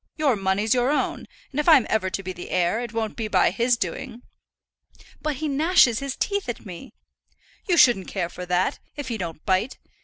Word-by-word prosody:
Your 290 -6 +2
money's 195 +2 +1
your 250 +1 +2
own; 295 - -1 0.2
and 280 - -3
if 300 - +2
I'm 290 -7 +7
ever 215 -4 0
to 195 - -4
be 185 0 -5
the 175 - -9
heir, 180 +4 +1
it 240 -2 -5
won't 225 -2 -3
be 225 -2 -3
by - - +3
his 240 0 +1
doing." 245 0 -5 1.0
"But 305 -2 -2
he 310 +4 -3
gnashes 290 -5 +4
his 275 -1 -4
teeth 405 -7 -2
at 240 - -5
me." 180 -4 -10 0.7
"You 355 -3 +2
shouldn't 235 - +5
care 185 -4 -2
for 180 +1 -8
that, 180 +1 0 0.2
if 285 -3 -6
he 230 -2 -3
don't 165 -3 -6
bite. 190 +6 0
230 Hz, 205 wpm, -24 LUFS, 190-275 Hz, 1.0 s, I'm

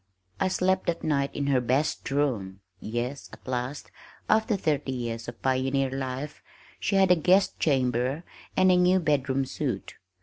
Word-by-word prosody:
I 190 - +2
slept 185 0 +1
that 170 -1 -1
night 140 -2 +1
in 140 - -1
her 135 -3 +2
"best 130 +6 0
room," 115 -10 -1 0.2
yes, 120 +6 -4
at - - -15
last, 130 +3 -4 0.4
after 220 0 +3
thirty 150 -6 -1
years 115 -3 -4
of 120 -1 -8
pioneer 130 +1 +1
life, 135 +2 -4 0.4
she - - 0
had 190 -1 +5
a - - +8
guest 185 +4 +3
chamber 130 +1 +1 0.3
and 185 0 +5
a 180 - +5
new 180 +1 +4
"bedroom 135 -4 +1
soot." 130 -7 -4
140 Hz, 160 wpm, -27 LUFS, 125-165 Hz, 0.4 s, a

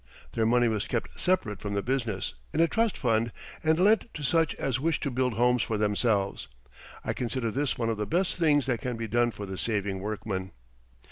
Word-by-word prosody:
Their 110 -1 +2
money 120 +1 +4
was 110 -2 -1
kept 120 - -3
separate 140 - 0
from 100 -1 -3
the 100 - 0
business, 115 -7 -1 0.2
in - - +1
a 165 - +6
trust 225 +3 +1
fund, 115 -2 +1 0.3
and 160 +1 +3
lent 215 +5 +4
to 150 - -5
such 165 +3 +2
as 130 -2 -1
wished 160 +3 0
to 140 - -1
build 125 0 +1
homes 125 +2 +3
for 110 - -1
themselves. 105 - +1 0.6
I - - 0
consider 120 -1 -2
this 135 +1 -1
one 115 -1 0
of 110 - -2
the 105 - -2
best 180 +4 +1
things 150 -5 +3
that 120 -4 -1
can 125 -1 -3
be 115 0 -3
done 120 +2 +2
for 105 -3 -6
the 95 -1 -6
saving 100 -4 -1
workman. 100 -2 -4
120 Hz, 210 wpm, -28 LUFS, 105-140 Hz, 0.6 s, a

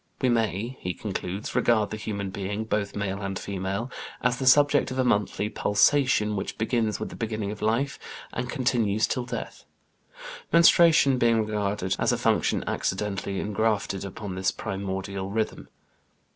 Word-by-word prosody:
"We 130 - +2
may," 115 +1 -1
he 90 0 -4
concludes, 95 -1 -4
"regard 110 -3 +2
the - - -2
human 100 -3 -4
being 100 +2 -3
both 105 -2 -2
male 100 0 -3
and 95 -1 -3
female 100 +5 -3 0.3
as 125 0 +2
the 130 - -2
subject 145 +2 +5
of 130 - -5
a 130 - +3
monthly 105 -3 +1
pulsation 105 +1 +2
which 95 - -4
begins 110 -1 0
with - - -4
the - - -9
beginning 110 -3 -3
of 105 - -8
life, 120 +6 0 0.3
and 125 +1 -3
continues 120 -6 +1
till 125 -2 -2
death," - - -6 0.9
menstruation 165 -5 +6
being 115 -2 +3
regarded 105 -3 -1
as - - +2
a - - +1
function - - +1
accidentally 100 0 -2
ingrafted 105 -2 -1
upon 100 0 -6
this 95 +1 0
primordial 95 -1 -4
rhythm. 110 +2 -3
105 Hz, 155 wpm, -26 LUFS, 100-120 Hz, 0.9 s, menstruation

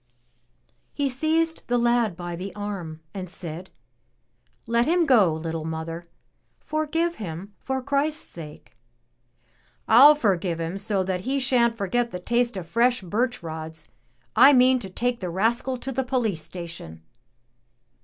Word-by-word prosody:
He 285 -2 0
seized 320 +5 0
the 245 - +2
lad 235 -6 +2
by 175 -1 -5
the 190 +3 -7
arm 190 -6 -5
and 185 -3 -6
said: 175 0 -6 1.0
"Let 235 +1 +1
him 345 +1 +3
go, 225 - +5
little 160 0 -4
mother! 160 +1 -5 0.5
Forgive 325 +2 -1
him 190 0 -7
for 265 -1 -3
Christ's 280 +3 0
sake." 155 -3 -11 1.1
"I'll 275 +7 +9
forgive 185 - 0
him 165 +4 -3
so 195 -1 0
that 185 -1 -2
he 265 +6 -1
shan't 245 -3 +2
forget 235 +4 0
the 180 - -6
taste 235 +3 0
of 180 - -5
fresh 240 +3 +2
birch 240 +5 -1
rods. 160 0 -7 0.5
I 285 - +8
mean 255 0 +5
to 195 - -7
take 240 +5 -1
the 180 - -4
rascal 230 +8 0
to 265 +2 -5
the 265 +1 -1
poUce 245 -7 0
station." 165 - -8
220 Hz, 145 wpm, -25 LUFS, 175-255 Hz, 1.1 s, I'll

